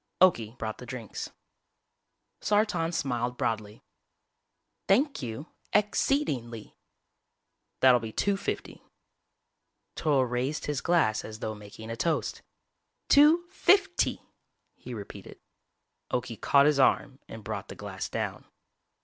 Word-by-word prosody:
Okie 120 -11 +3
brought 110 -2 -4
the 125 - -10
drinks. 120 -4 -6 1.1
Sartan 205 -5 +1
smiled 125 -6 -2
broadly. 110 -1 -3 1.0
"Thank 275 - +3
you 120 +5 -6 0.2
ex 210 0 +2
ceed 285 +2 +2
ing 120 -3 -3
ly." 115 -2 -10 1.1
"That'll 130 -2 +7
be 115 -1 -6
two 200 - +1
fifty." 195 - -5 1.1
Toryl 140 -5 +2
raised 125 +5 -2
his 145 -3 -2
glass 165 -11 +2
as 110 0 -8
though 110 -1 -4
making 105 +2 -10
a - - -3
toast. 160 +6 -1 0.7
"Two 310 +5 +6
fif 385 -2 +3
ty!" - - +1 0.6
he 125 - -8
repeated. 100 -2 -9 0.7
Okie 120 -4 -3
caught 140 0 +5
his 150 -1 +3
arm 135 0 +2
and 110 -1 -9
brought - - -5
the - - -9
glass - - -6
down. - - -4
130 Hz, 125 wpm, -28 LUFS, 115-175 Hz, 1.1 s, That'll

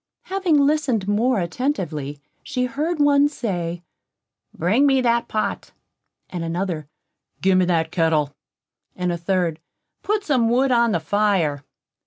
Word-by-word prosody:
Having 375 -5 +1
listened 280 -9 +1
more 225 +3 +2
attentively, 170 - -3 0.2
she 250 -1 -2
heard 300 +8 -2
one 290 0 +4
say: 175 - -4 0.7
"Bring 215 - +2
me 270 -1 +4
that 235 -2 +1
pot"; 215 - -3 0.6
another 170 -2 -3 0.5
"Give 190 0 +3
me 185 - +3
that 165 -2 0
kettle"; 160 -4 +1 0.6
and 180 -1 -1
a 170 - -2
third, 170 -2 0 0.4
"Put 420 0 -1
some 255 - +2
wood 260 +3 +2
upon 235 -2 +3
the - - +1
fire." 175 -6 +1
205 Hz, 130 wpm, -22 LUFS, 170-260 Hz, 0.7 s, one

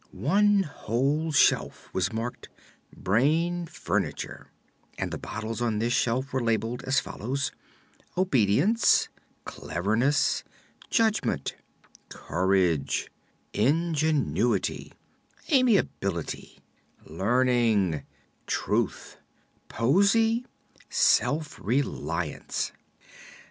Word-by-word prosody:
One 200 - +3
whole 145 - -1
shelf 140 - +2
was 95 0 0
marked: 115 +2 -5 0.4
"Brain 165 - +1
Furniture," - - -3 0.5
and - - -3
the - - -4
bottles 110 +2 -5
on 115 -3 0
this 115 +3 0
shelf 130 +4 0
were 130 - 0
labeled 115 +1 -1
as 130 0 +3
follows: 130 +5 -3 0.7
"Obedience," 175 - +3 0.4
"Cleverness," 110 - 0 0.5
"Judgment," 220 -2 +1 0.6
"Courage," 90 -3 0 0.4
"Ingenuity," 140 - +1 0.6
"Amiability," 195 - +1 0.5
"Learning," 110 - +1 0.5
"Truth," - - -1 0.5
"Poesy," 200 - +2 0.4
"Self 145 +5 +2
Reliance." 90 - -2
125 Hz, 70 wpm, -27 LUFS, 105-160 Hz, 0.7 s, One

